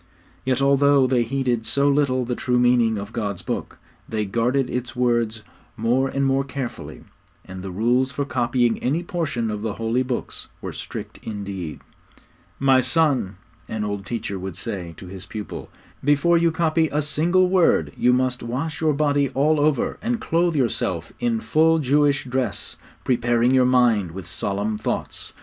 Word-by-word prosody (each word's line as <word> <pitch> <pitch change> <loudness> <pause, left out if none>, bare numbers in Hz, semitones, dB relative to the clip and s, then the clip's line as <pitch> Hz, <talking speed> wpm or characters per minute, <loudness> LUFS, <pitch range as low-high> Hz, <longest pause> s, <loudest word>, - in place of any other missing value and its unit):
Yet 130 +1 +1
although 140 0 +4
they 125 -1 +2
heeded 120 -1 0
so 140 0 +2
little 140 -3 +2
the 125 - -2
true 125 0 0
meaning 120 -2 +3
of 100 +2 -7
God's 100 -6 -2
Book, - - -4 0.3
they 110 -1 -1
guarded 120 +6 +1
its 125 0 -4
words 120 -3 0 0.3
more 120 +4 +2
and 140 +1 -1
more 135 0 +2
carefully; 135 -2 -6 0.4
and 95 0 -8
the 95 - -6
rules 120 +7 +1
for 140 +1 -2
copying 120 -2 +1
any 155 +7 0
portion 140 -11 -2
of 105 -1 -4
the 110 -1 -2
holy 115 +3 0
Books 130 -1 -4
were - - -6
strict - - -7
indeed. 100 -6 -6 0.8
'My 135 -1 +4
son,' 130 - +2 0.3
an 110 -1 -3
old 100 -1 -4
teacher 105 -5 -3
would 95 -2 -6
say 90 -3 -5
to - - -10
his 95 0 -8
pupil, 105 0 -7 0.3
'before 145 +5 +3
you 170 0 +4
copy 160 -1 +1
a 150 - +1
single 170 +5 +2
word 170 - +3
you 125 - +3
must 125 0 +1
wash 140 +8 -4
your 155 -1 +3
body 145 -1 +1
all 150 +3 +3
over, 145 -3 +1
and 235 +2 -1
clothe 170 -2 +1
yourself 100 - -1
in 235 -2 0
full 160 -5 +3
Jewish 145 -1 +2
dress, 125 -4 -2 0.3
preparing 120 -1 +2
your 130 -1 +4
mind 115 -9 +3
with 95 -1 -7
solemn 100 +4 -3
thoughts. 110 - -4
125 Hz, 165 wpm, -23 LUFS, 110-140 Hz, 0.8 s, although